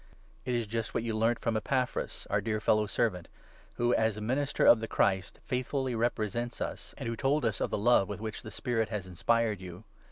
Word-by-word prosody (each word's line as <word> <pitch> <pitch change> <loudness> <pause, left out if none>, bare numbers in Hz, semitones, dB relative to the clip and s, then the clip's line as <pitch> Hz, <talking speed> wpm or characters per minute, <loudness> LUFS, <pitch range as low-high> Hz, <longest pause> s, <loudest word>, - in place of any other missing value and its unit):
It 125 -1 0
is 120 -1 0
just 115 +1 -3
what 115 - 0
you 115 - -1
7 110 - -2
learnt 115 +1 +2
from 115 -1 0
Epaphras, 125 +4 -1
our - - +2
dear 110 -1 -1
fellow 105 0 +2
servant, 100 -6 0 0.5
who, 120 +1 +2
as 110 -1 +2
a - - -4
minister 130 +6 0
of 120 - +8
the 115 - -4
Christ, 95 -4 +1
faithfully 130 +1 -1
represents 120 0 -1
us, - - -5
and - - -6
who 115 - -1
8 - - -8
told 140 0 +2
us 110 -4 0
of - - +1
the - - -1
love 105 -2 +4
with 105 - -4
which 110 0 -5
the - - -8
Spirit 115 -4 -1
has 105 -4 -3
inspired 105 +3 +1
you. 90 +2 -9
115 Hz, 225 wpm, -30 LUFS, 105-120 Hz, 0.5 s, of